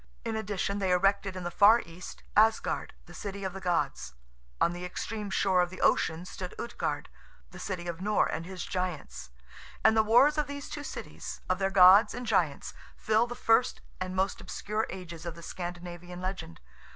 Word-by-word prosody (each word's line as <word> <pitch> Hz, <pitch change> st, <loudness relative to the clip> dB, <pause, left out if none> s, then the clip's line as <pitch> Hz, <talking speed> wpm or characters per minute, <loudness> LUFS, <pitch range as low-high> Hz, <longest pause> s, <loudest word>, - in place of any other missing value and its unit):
In 225 Hz, -1 st, -2 dB
addition, 205 Hz, -2 st, -2 dB
they 190 Hz, -2 st, 0 dB
erected 195 Hz, +1 st, +2 dB
in 185 Hz, -, -5 dB
the 175 Hz, -, -3 dB
far 215 Hz, +6 st, +7 dB
East, 170 Hz, +2 st, -10 dB
Asgard, 220 Hz, -, +2 dB
the -, -, -14 dB
City 200 Hz, -1 st, -6 dB
of 190 Hz, -1 st, -3 dB
the 195 Hz, -, -7 dB
Gods; 170 Hz, -, -1 dB, 0.4 s
on 170 Hz, -, +3 dB
the 175 Hz, +1 st, -6 dB
extreme 210 Hz, +3 st, -4 dB
shore 190 Hz, -1 st, +3 dB
of 175 Hz, -, 0 dB
the 185 Hz, -, -10 dB
ocean 165 Hz, +2 st, +2 dB
stood 185 Hz, 0 st, -7 dB
Utgard, 235 Hz, -, -3 dB, 0.4 s
the -, -, -11 dB
City 180 Hz, -3 st, -4 dB
of 170 Hz, 0 st, -5 dB
Nor 210 Hz, +2 st, +2 dB
and 165 Hz, -, -3 dB
his 185 Hz, +1 st, -6 dB
giants, 150 Hz, -, -4 dB, 0.5 s
and 220 Hz, -, +6 dB
the 220 Hz, -, +6 dB
wars 250 Hz, +8 st, +5 dB
of 300 Hz, -, 0 dB
these 285 Hz, 0 st, -7 dB
two 295 Hz, -, -5 dB
cities, 270 Hz, -, -7 dB
of 185 Hz, +1 st, 0 dB
their 195 Hz, 0 st, +1 dB
gods 195 Hz, +2 st, +7 dB
and 245 Hz, 0 st, -5 dB
giants, 175 Hz, -10 st, 0 dB, 0.2 s
fill 220 Hz, +2 st, +2 dB
the 240 Hz, -, -6 dB
first 240 Hz, 0 st, +2 dB, 0.2 s
and 185 Hz, 0 st, -4 dB
most 190 Hz, +1 st, 0 dB
obscure 215 Hz, +2 st, -3 dB
ages 170 Hz, -3 st, -8 dB
of 170 Hz, -2 st, -5 dB
the 170 Hz, -, -12 dB
Scandinavian 175 Hz, 0 st, -7 dB
legend. 185 Hz, -, -5 dB
190 Hz, 190 wpm, -29 LUFS, 175-215 Hz, 0.5 s, far